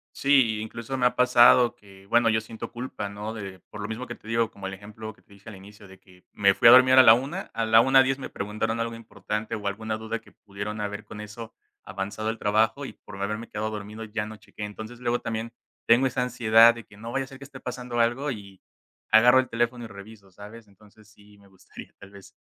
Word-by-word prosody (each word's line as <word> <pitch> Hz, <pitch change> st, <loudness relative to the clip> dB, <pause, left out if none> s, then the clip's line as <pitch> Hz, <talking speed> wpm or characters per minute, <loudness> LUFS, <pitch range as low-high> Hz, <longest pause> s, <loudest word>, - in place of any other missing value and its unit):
Sí, 135 Hz, -6 st, +3 dB
i -, -, -4 dB
incluso 115 Hz, +4 st, -6 dB
me 125 Hz, -1 st, +3 dB
ha -, -, -3 dB
pasado 125 Hz, -1 st, +5 dB
que 95 Hz, -1 st, -18 dB
bueno, 115 Hz, +2 st, +3 dB
yo 110 Hz, -, +2 dB
siento 110 Hz, +1 st, -9 dB
culpa, 120 Hz, -4 st, -6 dB
¿no?, 105 Hz, +2 st, -6 dB
de 100 Hz, -4 st, -8 dB
por 105 Hz, -, -8 dB
lo 100 Hz, -, -4 dB
mismo 115 Hz, +3 st, -5 dB
que 120 Hz, -, -7 dB
te 110 Hz, -, -17 dB
digo, 115 Hz, 0 st, 0 dB
como 95 Hz, -1 st, -8 dB
el 95 Hz, -, -6 dB
ejemplo 110 Hz, +2 st, -9 dB
que -, -, -24 dB
te 100 Hz, -, -21 dB
dije 100 Hz, +2 st, -14 dB
al 105 Hz, -, -10 dB
inicio 100 Hz, +1 st, -14 dB
de 95 Hz, 0 st, -16 dB
que 90 Hz, -1 st, -22 dB
me 100 Hz, -1 st, +3 dB
fui 115 Hz, +4 st, +4 dB
a -, -, +11 dB
dormir 130 Hz, 0 st, +7 dB
a 130 Hz, -, +9 dB
la 110 Hz, -2 st, +9 dB
1:00, 135 Hz, +4 st, -4 dB
a 115 Hz, -, -2 dB
las 110 Hz, +1 st, +6 dB
1:10 135 Hz, 0 st, +4 dB
me -, -, -7 dB
preguntaron 110 Hz, +3 st, -3 dB
algo 115 Hz, 0 st, -2 dB
importante 105 Hz, -1 st, -5 dB
o 105 Hz, -, -8 dB
alguna 110 Hz, +2 st, -3 dB
duda 110 Hz, 0 st, -5 dB
que -, -, -20 dB
pudieron 105 Hz, +1 st, -7 dB
haber 105 Hz, +1 st, -5 dB
con 105 Hz, +1 st, -11 dB
eso 110 Hz, +2 st, -9 dB, 0.3 s
avanzado 100 Hz, +3 st, -4 dB
el 115 Hz, -, -3 dB
trabajo 110 Hz, +7 st, +1 dB
y -, -, -8 dB
por 100 Hz, -1 st, -13 dB
haberme 105 Hz, +3 st, -4 dB
quedado 110 Hz, +1 st, -3 dB
dormido 105 Hz, +1 st, -7 dB
ya 105 Hz, -1 st, -4 dB
no 110 Hz, 0 st, -10 dB
chequé. 105 Hz, 0 st, -9 dB
Entonces 110 Hz, +3 st, -9 dB
luego 120 Hz, 0 st, -1 dB
también 115 Hz, 0 st, -4 dB, 0.4 s
tengo 120 Hz, +3 st, +5 dB
esa 125 Hz, -1 st, -1 dB
ansiedad 115 Hz, -1 st, +5 dB
de 115 Hz, -, -10 dB
que 100 Hz, -, -18 dB
no 115 Hz, +3 st, -8 dB
vaya 135 Hz, +1 st, -1 dB
a -, -, -18 dB
ser 135 Hz, -1 st, -13 dB
que 140 Hz, -, -10 dB
esté 135 Hz, -1 st, -12 dB
pasando 125 Hz, -1 st, -5 dB
algo 120 Hz, +5 st, +1 dB
y 100 Hz, -5 st, -8 dB, 0.5 s
agarro 125 Hz, +4 st, +6 dB
el 130 Hz, -, -1 dB
teléfono 120 Hz, +1 st, -1 dB
y -, -, -7 dB
reviso, 100 Hz, 0 st, -13 dB
¿sabes? 105 Hz, +3 st, -13 dB
Entonces 105 Hz, +1 st, -21 dB
sí 105 Hz, -1 st, -21 dB
me 100 Hz, -, -20 dB
gustaría 95 Hz, -1 st, -14 dB
tal 100 Hz, -, -14 dB
vez 100 Hz, -1 st, -15 dB
110 Hz, 245 wpm, -25 LUFS, 105-120 Hz, 0.5 s, a